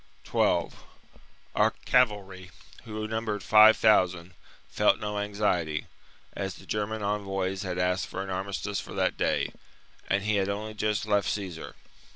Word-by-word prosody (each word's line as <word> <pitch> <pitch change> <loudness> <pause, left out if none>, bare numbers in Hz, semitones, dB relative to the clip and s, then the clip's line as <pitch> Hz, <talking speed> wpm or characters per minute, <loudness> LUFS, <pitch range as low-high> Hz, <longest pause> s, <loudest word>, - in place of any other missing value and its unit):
12. - - 0 0.7
Our - - +3
cavalry, 100 -7 +1 0.4
who 110 -1 -4
numbered 110 -2 -3
five 110 +1 +7
thousand, 90 -5 +3 0.3
felt - - +2
no 105 0 -3
anxiety, 100 -7 -1 0.5
as 95 -1 -4
the - - -14
German 105 0 -3
envoys 95 -2 -2
had 90 -3 -4
asked 90 +1 0
for 95 - -5
an 95 - -6
armistice 100 +1 -3
for - - -8
that - - +1
day, - - 0 0.6
and 100 0 +1
had 100 -2 +1
only 105 +2 -4
just 105 0 -1
left 105 -2 +1
Caesar. 95 -6 -5
100 Hz, 140 wpm, -28 LUFS, 95-105 Hz, 0.7 s, five